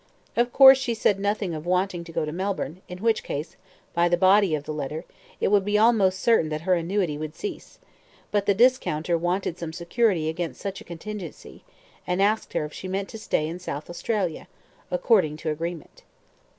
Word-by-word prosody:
Of 240 +1 +2
course 265 0 +9
she 240 -3 -1
said 205 -2 +2
nothing 200 -2 -1
of 155 +1 -6
wanting 180 -1 0
to 165 - -10
go 155 - -1
to 150 - -4
Melbourne, 185 -1 -3
in 180 - -7
which 225 -1 +2
case, 150 +4 -5 0.4
by 175 0 +3
the 175 - +3
body 190 -1 +4
of 145 - -5
the 155 - -5
letter, 150 +2 -4 0.3
it - - +1
would 200 -1 +4
be 205 +1 +1
almost 210 -4 +4
certain 225 -9 +3
that 155 0 -3
her 185 +2 +2
annuity 170 -3 0
would 155 0 -6
cease, 415 - -7 0.5
but 205 -1 0
the 200 - +4
discounter 190 -9 +2
wanted 175 +1 -1
some 170 -2 -4
security 175 0 +1
against 165 +1 -3
such 195 -1 -5
a - - -13
contingency, 175 +1 -8 0.4
and 180 +1 0
asked 210 +3 +1
her - - 0
if 150 - -9
she 190 - -7
meant 195 +1 -3
to 220 - -8
stay 155 -7 0
in 170 +3 -6
South 150 -3 -6
Australia, 185 -2 -2 0.4
according 200 - +2
to 155 0 -3
agreement. 165 +1 -6
180 Hz, 195 wpm, -25 LUFS, 160-205 Hz, 0.5 s, course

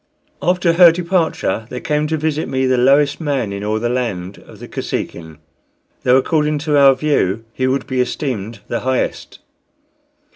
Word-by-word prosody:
After 180 -1 +2
her 175 0 +8
departure 170 -9 -1
there 125 - -5
came 150 +2 -1
to 160 +1 -1
visit 155 0 -2
me 130 0 0
the 130 0 +2
lowest 140 +4 +3
man 135 -9 -1
in 100 0 -5
all 105 +1 -1
the 120 - -1
land 105 -7 -3
of - - -14
the - - -10
Kosekin, 80 -2 -5 0.6
though, 125 0 +4
according 150 +2 +1
to 150 -2 +1
our 140 -2 +6
view, 115 -7 0
he 130 - -1
would 130 +1 -1
be 130 -1 -1
esteemed 115 -5 -4
the 120 - -2
highest. 130 0 -2
130 Hz, 170 wpm, -18 LUFS, 115-150 Hz, 0.6 s, her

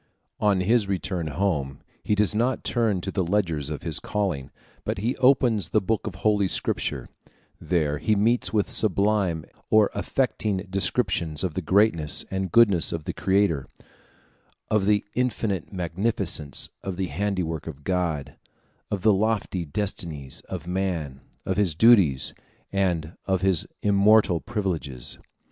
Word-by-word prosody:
On 100 -3 +2
his 110 +2 +2
return 90 -3 -2
home, 75 -4 -1 0.2
he 105 - +1
does 105 -2 +3
not 120 +4 0
turn 110 -6 0
to 95 - -4
the 95 - 0
ledgers 85 -6 0
of 75 -2 -5
his 80 -2 +1
calling, 95 -11 -2 0.3
but - - -2
he 115 +6 -1
opens 125 -5 +3
the 110 - +3
book 110 +3 -2
of 95 - -5
Holy 100 +1 +2
Scripture; - - -1 0.5
there 75 -3 0
he 110 +8 +1
meets 115 +4 +2
with 105 -2 0
sublime 100 -5 +1 0.2
or 110 -1 +4
affecting 105 -6 -1
descriptions 95 -5 +1
of 90 -4 -1
the 95 - -2
greatness 90 -4 +2
and 95 -2 -2
goodness 100 -8 +4
of 80 -2 -4
the - - -4
Creator, 95 -8 +1 1.0
of 105 -2 +2
the 105 -1 +2
infinite 115 -8 -1
magnificence 90 -3 -1 0.2
of 95 -2 -4
the 95 -1 -2
handiwork 85 -1 -2
of 75 -3 -8
God, 85 -5 -2 0.5
of 100 -2 -3
the 110 -1 +5
lofty 100 -3 0
destinies 75 -6 -3
of 90 -3 -5
man, 85 -7 -3 0.2
of 95 - -1
his 95 -7 +2
duties, 95 - +5 0.4
and 90 -5 -1
of 95 -2 +1
his 95 -5 +3 0.2
immortal 100 -2 +4
privileges. 85 - -3
95 Hz, 145 wpm, -25 LUFS, 80-105 Hz, 1.0 s, the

